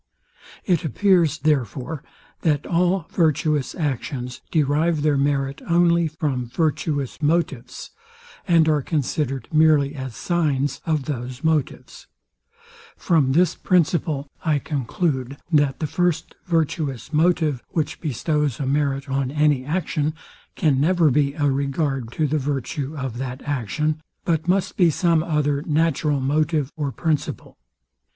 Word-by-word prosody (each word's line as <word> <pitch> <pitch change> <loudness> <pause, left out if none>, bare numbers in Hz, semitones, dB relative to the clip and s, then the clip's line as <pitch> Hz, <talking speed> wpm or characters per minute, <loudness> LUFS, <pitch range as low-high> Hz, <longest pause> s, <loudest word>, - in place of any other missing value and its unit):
It 175 -5 +2
appears, 170 -1 +3
therefore, 145 0 -1 0.4
that 150 -4 +1
all 180 0 +1
virtuous 155 -3 +1
actions 130 -5 -3
derive 155 +1 +1
their 150 -2 +3
merit 140 -1 0
only 170 -1 +3
from 145 -5 -2
virtuous 145 0 -1
motives, 145 -6 -1 0.6
and 165 -3 +4
are 150 -2 +3
considered 135 -2 -2
merely 155 -2 +4
as 130 -5 -6
signs 145 -5 0
of 155 -4 0
those 125 -1 -5
motives. 160 -4 -2 0.9
From 150 -7 +2
this 175 +2 +3
principle 160 -4 +1 0.2
I 155 -3 +2
conclude, 140 -1 -2
that 145 -4 +2
the 155 - -1
first 170 +1 -1
virtuous 155 -5 -1
motive, 155 -4 +2
which 155 -4 -2
bestows 150 -2 -1
a 140 - -1
merit 140 0 0
on 135 -1 -1
any 150 -2 +2
action, 155 0 -1 0.4
can 140 -4 +2
never 165 -1 +3
be 140 +1 +1
a 145 - 0
regard 135 -2 -1
to 155 - 0
the 150 +1 0
virtue 140 +2 -3
of 130 -4 -4
that 130 0 -5
action, 150 +3 -1 0.2
but 165 -1 0
must 185 +1 +1
be 175 -3 +5
some 165 0 +2
other 150 -3 0
natural 155 -2 +1
motive 150 +1 0
or 145 -3 -2
principle. 155 +1 -2
150 Hz, 130 wpm, -22 LUFS, 135-160 Hz, 0.9 s, be